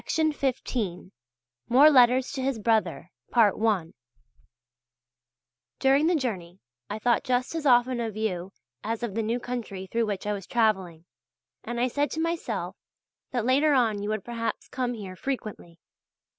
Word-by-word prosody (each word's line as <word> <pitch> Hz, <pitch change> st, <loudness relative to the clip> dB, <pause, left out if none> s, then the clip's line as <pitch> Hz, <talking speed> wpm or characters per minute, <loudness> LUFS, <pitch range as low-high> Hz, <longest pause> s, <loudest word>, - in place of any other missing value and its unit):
MORE 280 Hz, +6 st, +7 dB
LETTERS 255 Hz, -1 st, +5 dB
TO 270 Hz, -, -4 dB
HIS 265 Hz, -2 st, -1 dB
BROTHER 220 Hz, 0 st, 0 dB, 2.7 s
During 275 Hz, +3 st, +4 dB
the 350 Hz, -, +3 dB
journey 190 Hz, -, -3 dB, 0.3 s
I 210 Hz, -, -3 dB
thought 235 Hz, +1 st, +1 dB
just 250 Hz, +2 st, 0 dB
as 320 Hz, -3 st, -2 dB
often 245 Hz, 0 st, +4 dB
of 225 Hz, -3 st, -3 dB
you 190 Hz, -4 st, -2 dB, 0.3 s
as 225 Hz, +2 st, -3 dB
of 230 Hz, -5 st, -3 dB
the 225 Hz, -, -1 dB
new 230 Hz, +3 st, -1 dB
country 230 Hz, -6 st, -5 dB
through 230 Hz, +4 st, -1 dB
which 205 Hz, -2 st, -3 dB
I 210 Hz, -, 0 dB
was 195 Hz, -3 st, -6 dB
travelling, 190 Hz, -8 st, 0 dB, 0.6 s
and 240 Hz, +1 st, -4 dB
I 250 Hz, -, +2 dB
said 285 Hz, +4 st, 0 dB
to 320 Hz, -, -3 dB
myself, 330 Hz, +1 st, -2 dB, 0.5 s
that 245 Hz, -3 st, -2 dB
later 285 Hz, +4 st, +3 dB
on 225 Hz, -5 st, +2 dB
you 205 Hz, -, -3 dB
would 215 Hz, -2 st, -3 dB
perhaps 230 Hz, -1 st, -4 dB
come 245 Hz, -2 st, -2 dB
here 195 Hz, -4 st, -8 dB
frequently. 215 Hz, -8 st, -5 dB
235 Hz, 145 wpm, -27 LUFS, 210-255 Hz, 2.7 s, MORE